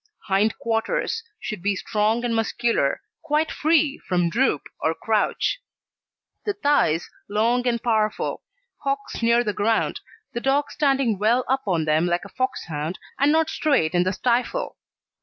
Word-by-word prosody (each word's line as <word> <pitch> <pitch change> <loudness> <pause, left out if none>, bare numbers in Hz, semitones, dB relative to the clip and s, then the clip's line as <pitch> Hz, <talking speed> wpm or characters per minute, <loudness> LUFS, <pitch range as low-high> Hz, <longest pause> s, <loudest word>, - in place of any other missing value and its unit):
HIND 200 +2 +2
QUARTERS 230 - -1 0.2
Should 215 -5 -5
be 200 +2 +1
strong 215 +4 0
and 235 -1 0
muscular, 225 -8 0 0.2
quite 310 0 0
free 310 -2 +2
from 175 -2 0
droop 265 +7 +1 0.2
or - - 0
crouch; - - 0 0.8
the 415 - -1
thighs 285 - +2 0.2
long 235 +4 +1
and 235 -1 0
powerful; 215 -3 0 0.4
hocks 275 -2 -2
near 235 +1 +4
the 210 -3 -1
ground, 220 +3 +1 0.3
the 235 - -3
dog 275 +2 +1
standing 270 -8 +1
well 235 +4 +2
up 265 +1 +1
on 170 -5 +1
them 155 +3 +2
like 175 +2 0
a - - -10
Foxhound, 170 - -3 0.2
and 280 +2 +4
not 320 0 +3
straight 275 - +1
in 175 - +3
the 185 +1 +1
stifle. 245 +4 0
235 Hz, 150 wpm, -24 LUFS, 200-275 Hz, 0.8 s, near